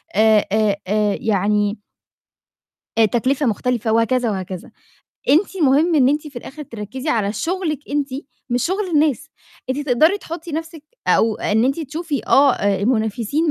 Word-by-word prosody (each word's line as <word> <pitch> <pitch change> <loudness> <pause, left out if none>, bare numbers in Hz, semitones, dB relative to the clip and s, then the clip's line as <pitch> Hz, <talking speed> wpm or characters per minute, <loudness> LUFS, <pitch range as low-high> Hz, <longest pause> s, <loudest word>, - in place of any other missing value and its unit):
آآ 215 0 +4
آآ 215 -2 +2
آآ 210 -1 +1
يعني 205 0 +1 1.2
آآ، 225 - +6
تكلفة 255 +6 0
مختلفة 235 0 0
وهكذا 230 +2 +2
وهكذا، 185 -2 -6 0.6
أنتِ 370 +6 +3
مهم 300 +5 +4
إن 265 -4 +5
أنتِ 295 +2 0
في 275 - -16
الآخر 270 +5 -8
تركّزي 240 +3 -7
على 210 -6 +1
شغلِك 330 - -2
أنتِ، 285 -1 0 0.4
مش 245 0 +1
شغل 385 +3 -1
الناس، 300 0 +2 0.4
أنتِ 265 - -1
تقدري 315 +11 +4
تحطي 335 -3 -8
نَفْسِك 325 0 -5 0.3
أو 225 -1 +3
إن 220 +3 +1
أنتِ 275 +5 0
تشوفي 310 0 -3
آه، 275 -1 +5
آآ، 200 -1 0
المنافسين 230 +7 0
255 Hz, 145 wpm, -20 LUFS, 215-305 Hz, 1.2 s, آآ